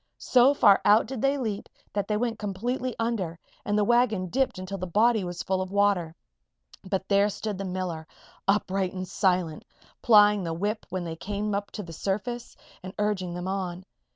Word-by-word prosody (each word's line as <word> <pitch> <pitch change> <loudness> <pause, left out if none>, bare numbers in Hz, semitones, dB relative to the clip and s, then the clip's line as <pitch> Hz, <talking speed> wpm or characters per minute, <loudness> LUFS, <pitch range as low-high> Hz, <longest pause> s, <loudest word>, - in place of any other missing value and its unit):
So 255 +3 +4
far 200 -7 +6
out 210 +2 +5
did 250 -1 -5
they 275 +1 +2
leap 220 -6 -3 0.2
that 205 -1 -1
they 210 - 0
went 230 -1 -2
completely 240 +5 -3
under 220 -8 -2 0.3
and 205 0 0
the 210 - +3
wagon 220 -5 +2
dipped 265 0 0
until 185 +1 -5
the 185 - -4
body 220 +4 +3
was 175 0 -5
full 190 0 0
of 185 0 -5
water. 200 -5 +1 0.7
But 190 0 -3
there 200 +1 +3
stood 205 -1 -4
the 195 - -3
miller, 180 -4 -4 0.4
upright 195 -2 +1
and 185 -1 -5
silent, 180 -4 0 0.4
plying 210 -3 +6
the 165 -1 -3
whip 210 +5 -2
when 185 -1 -3
they 165 -1 -5
came 205 +3 -3 0.2
to 210 - -5
the 165 -2 -9
surface, 215 +8 -3 0.2
and 185 0 -9
urging 190 -4 -1
them 180 +1 -4
on. 185 -1 -3
200 Hz, 180 wpm, -27 LUFS, 185-215 Hz, 0.7 s, far